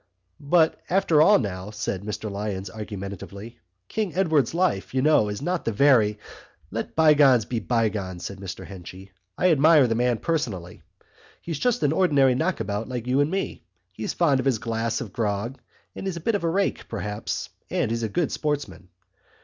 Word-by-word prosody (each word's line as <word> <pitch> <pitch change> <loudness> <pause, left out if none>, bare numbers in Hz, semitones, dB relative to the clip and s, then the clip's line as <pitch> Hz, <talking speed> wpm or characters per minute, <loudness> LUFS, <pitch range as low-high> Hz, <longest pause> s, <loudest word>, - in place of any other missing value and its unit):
"But 160 +2 +2
after 170 -4 +3
all 205 +6 +7
now," 95 -3 -4
said 105 -3 -3
Mr 105 +1 -5
Lyons 100 -2 -4
argumentatively, 105 +1 -8 0.3
"King 210 -6 -3
Edward's 160 -7 +2
life, 170 - 0
you 130 - +2
know, 150 -9 +4
is 105 +6 -5
not 180 +1 -1
the 115 - -1
very...." 110 -3 +4 0.5
"Let 115 +3 -4
bygones 145 -7 +5
be 115 0 -2
bygones," 105 -6 -1
said 100 0 -6
Mr 95 -3 -7
Henchy. 95 0 -11 0.3
"I 185 - +3
admire 155 -1 +6
the 115 - +1
man 120 0 +1
personally. 105 - -3 0.6
He's 165 -4 -5
just 245 -10 +1
an 145 - +3
ordinary 145 -7 +4
knockabout 125 - -2
like 125 -2 -4
you 130 +2 +1
and 145 +1 +3
me. 195 +3 -3 0.3
He's 110 +4 -4
fond 145 -6 +3
of 130 - -1
his 130 -4 +2
glass 115 +1 -2
of 105 -7 -7
grog 110 +3 -2 0.4
and 195 - -5
he's 185 -3 -3
a - - -4
bit 225 +8 0
of 205 - -1
a 165 - +1
rake, 195 +4 -1
perhaps, 105 -1 -4 0.2
and - - 0
he's 115 0 -1
a 110 - -1
good 165 +8 0
sportsman. 145 - -3
120 Hz, 180 wpm, -25 LUFS, 105-155 Hz, 0.6 s, all